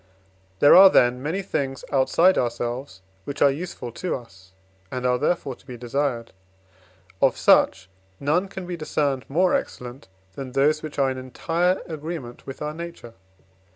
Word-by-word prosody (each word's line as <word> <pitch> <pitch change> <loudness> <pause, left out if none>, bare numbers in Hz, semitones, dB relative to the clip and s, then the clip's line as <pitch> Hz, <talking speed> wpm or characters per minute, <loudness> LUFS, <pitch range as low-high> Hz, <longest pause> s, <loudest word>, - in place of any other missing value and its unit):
There 145 - +8
are, 190 +1 +10
then, 125 -6 +3
many 165 +8 -2
things 135 -7 -3
outside 165 +7 +4
ourselves, 120 -3 -3 0.2
which 140 +5 -6
are 140 - +5
useful 140 -5 -6
to 180 +9 -3
us, 95 -7 -13 0.4
and 125 -1 -4
are, 125 0 +2
therefore, 145 -4 0
to 125 - -20
be 125 -2 -8
desired. 120 -1 -2 0.9
Of - - +3
such 95 0 +4 0.3
none 160 +7 +1
can 190 -1 -8
be 175 0 -4
discerned 145 -4 -2
more 180 +6 +2
excellent, 125 +3 -4 0.3
than 130 +1 -7
those 150 +3 +2
which 155 -1 -8
are 135 -2 +2
in 130 - -5
entire 165 +8 -1
agreement 155 -6 -7
with 135 +2 -7
our 150 0 -3
nature. 170 -8 -9
140 Hz, 155 wpm, -24 LUFS, 125-165 Hz, 0.9 s, are